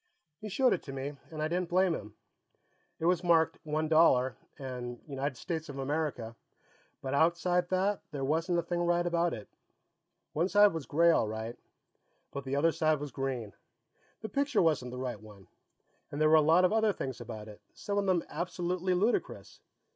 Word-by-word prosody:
He 215 - -7
showed 255 +5 +3
it - - -2
to 135 - -6
me, 135 +2 -5
and 155 -1 -4
I - - +1
didn't 175 +1 -2
blame 185 0 +3
him. 105 -7 -7 0.8
It 160 - -4
was 180 0 +2
marked 165 -2 +3
One 155 +1 -1
Dollar, 130 -6 +4 0.2
and 125 -3 -6
United 140 -2 -3
States 160 0 -4
of 140 - -7
America, 135 -5 -2 0.7
but 135 0 -3
outside 170 +3 +2
that 195 +2 +1
there 145 -3 -5
wasn't 165 +5 +1
a 170 - +1
thing 175 +1 -2
right 175 0 +2
about 170 0 +1
it. 105 - -7 0.9
One 170 +5 +1
side 205 -1 +6
was 160 -3 -5
gray, 170 +3 +4
all 115 - +2
right, 110 +2 -5 0.8
but 140 -1 -6
the 135 +1 -2
other 165 +4 +3
side 155 -1 +1
was 145 -1 -6
green. 125 -5 -4 0.7
The 220 - -5
picture 275 -2 +1
wasn't 150 -6 +1
the 125 - -7
right 125 -4 -4
one. 105 -3 -14 0.7
And 145 - -5
there 155 0 +4
were - - +4
a 155 - +7
lot 165 +4 +5
of 185 - +2
other 220 -2 +3
things 130 -7 -5
about 110 -2 -7
it, 105 -1 -12
some 205 0 -2
of 200 - -1
them 180 -3 +2
absolutely 180 +2 -2
ludicrous. 210 +7 -1
160 Hz, 190 wpm, -31 LUFS, 135-175 Hz, 0.9 s, a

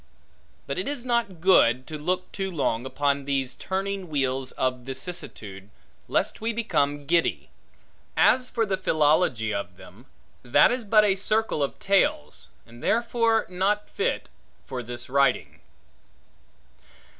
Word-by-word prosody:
But - - -3
it 380 - -3
is 280 -4 -4
not 235 -8 -1
good 130 -9 +4
to 155 - -7
look 180 +4 -2
too 195 -1 -3
long 130 -7 -1
upon 140 0 0
these 135 -2 -1
turning 195 -1 -4
wheels 135 -3 -1
of 130 -1 -1
vicissitude, 125 - -5 0.4
lest - - -1
we 230 +1 -1
become 145 -10 0
giddy. 165 +2 0 0.7
As 255 -1 +4
for 230 -2 0
the 195 -2 -1
philology 150 - +2
of 90 -3 -5
them, - - -15 0.3
that 125 +4 +4
is 245 -2 -2
but 215 0 +5
a 200 - +4
circle 215 -3 0
of 140 - -2
tales, 135 - 0 0.2
and 120 +1 -15
therefore 230 -1 +1
not 195 +3 0
fit 455 +5 -2 0.4
for 130 -2 -5
this 120 0 -7
writing. 140 0 +1
160 Hz, 135 wpm, -25 LUFS, 130-210 Hz, 0.7 s, but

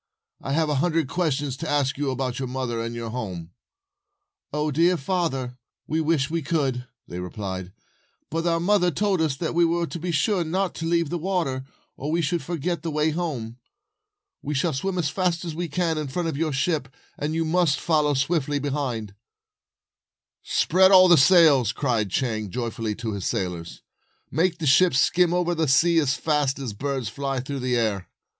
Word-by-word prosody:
"I 135 - -3
have 160 +1 +2
a 150 - 0
hundred 165 -3 +1
questions 145 -5 -1
to 160 +2 -5
ask 145 -2 +1
about 130 -3 -2
your 130 - -3
mother 125 -2 -3
and 115 +1 -4
your 115 -1 -5
home.,, 90 -9 -5 1.0
"O 150 0 -1 0.3
father 160 -5 -1
dear! 125 - -17 0.3
We 160 +1 -1
wish 155 -3 +1
we 165 +2 -2
could," 135 -5 -1 0.2
they 90 - -6
replied; 95 0 -5 0.6
"but 165 +2 -1
our 165 0 +2
mother 180 0 +3
told 190 +2 0
us 155 -4 +1
that 165 - -2
we 170 0 +3
were 170 +1 +1
to 170 - -6
be 175 +2 -3
sure 175 +4 +1
not 185 +3 -1
to 165 - -4
leave 170 -2 +1
the 175 - -2
water, 160 -8 -1 0.3
or 145 - -4
we 165 +2 +1
should 170 +2 0
forget 170 0 -3
the 165 - -3
way 155 +1 +1
home. 140 -9 -4 0.8
We 150 - -3
shall 155 +4 +1
swim 185 +8 -2
as 165 -5 0
fast 180 -2 -1
as 165 - -4
we 175 +2 -3
can 165 0 -1
in 150 - -3
front 165 +6 -2
of 155 - -4
your 155 +1 -1
ship, 145 +1 0 0.3
and 150 +2 -3
you 165 0 0
must 160 -3 +2
follow 150 -3 +2
swiftly 145 +1 0
behind." 135 -7 -3 1.3
"Spread 190 +2 +3
all 185 -1 +8
the 175 - +8
sails," 145 - +6
cried 115 -6 -1
Chang, 110 -1 -1
joyfully, 115 -1 -3
to 110 -1 -4
his 100 -2 -3
sailors. 85 -3 -4 0.2
" - - -43
Make 170 +4 +1
the 160 - -4
ship 150 +3 +5
skim 175 +5 +3
over 175 0 +1
the 160 -2 0
sea 165 +5 +4
as 145 -3 +1
fast 150 -4 0
as 135 -5 -4
a - - -11
bird 135 0 -3
flies 135 +3 -3
through 140 +1 -4
the 125 -1 0
air." 105 -5 -1
150 Hz, 190 wpm, -24 LUFS, 130-170 Hz, 1.3 s, all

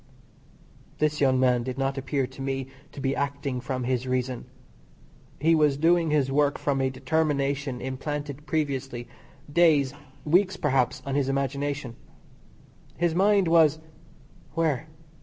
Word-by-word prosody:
This 150 0 0
young 130 -2 +4
man 125 -2 +3
did 130 +2 -5
not 135 0 0
appear 135 0 -1
to 135 - -11
me 135 0 -2 0.3
to - - -10
be 135 0 0
acting 140 -2 -2
from 130 -1 -3
his 125 0 -1
reason. 125 -1 -2 0.9
He 165 +3 +4
was 150 -3 +3
doing 165 +2 +3
his 145 -3 +1
work 145 +1 +2
from 140 -2 0
a 130 - +2
determination 140 -2 -1
implanted 145 +2 -5
previously, 135 -6 -2 0.5
days, 150 -5 +4 0.3
weeks 185 +4 +3
perhaps, 135 -6 +1
on 140 - -3
his 140 -1 +1
imagination. 140 -1 -2 1.0
His 170 -1 +1
mind 195 +1 +3
was 160 -2 +5 0.8
where? 155 -3 0
140 Hz, 135 wpm, -26 LUFS, 130-150 Hz, 1.0 s, was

